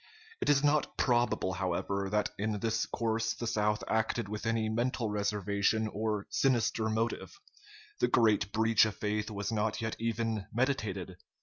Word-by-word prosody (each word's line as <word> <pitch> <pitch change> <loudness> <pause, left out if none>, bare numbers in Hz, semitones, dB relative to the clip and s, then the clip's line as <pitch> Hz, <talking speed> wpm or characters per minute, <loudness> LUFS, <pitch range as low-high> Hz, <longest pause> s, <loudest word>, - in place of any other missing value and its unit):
It - - 0
is 140 -1 +4
not 145 +1 +2
probable, 120 -6 +1
however, 95 +1 -1
that 105 +1 0
in 105 0 -1
this 115 +1 0
course 115 -1 -1
the 120 - -5
South 105 -2 0
acted 110 0 0
with 105 +2 -4
any 115 -1 +1
mental 115 0 -1
reservation 105 +1 0
or 105 -1 -2
sinister 115 -4 +2
motive. 110 -5 -2 0.6
The - - +3
great 110 -5 +3
breach 110 0 +4
of 105 - -5
faith 105 +1 -1
was 100 0 -3
not 110 0 0
yet 110 0 -2
even 115 -3 -1
meditated. 110 -8 -1
110 Hz, 150 wpm, -31 LUFS, 105-115 Hz, 0.6 s, is